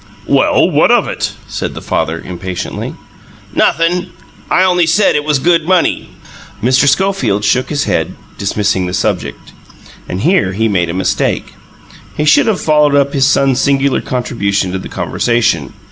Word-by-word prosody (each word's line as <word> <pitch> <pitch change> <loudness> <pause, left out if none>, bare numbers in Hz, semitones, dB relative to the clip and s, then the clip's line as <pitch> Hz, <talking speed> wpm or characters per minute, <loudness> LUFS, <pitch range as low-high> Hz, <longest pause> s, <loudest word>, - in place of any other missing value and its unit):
"Well, - - +3
what - - +3
of - - +3
it?" - - -3
said - - -4
the - - -5
father, 80 +1 -2
impatiently. 90 +1 -6 0.6
"Nothin'. 175 +2 +1 0.4
I 185 - +3
only 180 -2 +2
said 195 +5 +3
it 150 - 0
was 150 -1 +1
good 165 +2 +1
money." 185 -2 +1 0.5
Mr. 130 +6 +2
Schofield 190 - 0
shook 125 +4 +1
his 145 -2 -1
head, 80 - -1 0.2
dismissing 100 -2 -1
the 90 - -3
subject; - - -3 0.6
and 90 - -3
here 165 - +2
he 110 +3 0
made 90 -5 0
a 85 - -3
mistake: 95 - -1 0.6
he 150 - 0
should 155 +8 +4
have 215 -4 +1
followed 150 -2 +2
up 140 0 +2
his 135 -1 +2
son's 135 -2 +2
singular 140 -1 +1
contribution 100 -7 -2
to 95 - -3
the - - -8
conversation. 115 - 0
135 Hz, 160 wpm, -14 LUFS, 100-160 Hz, 0.6 s, should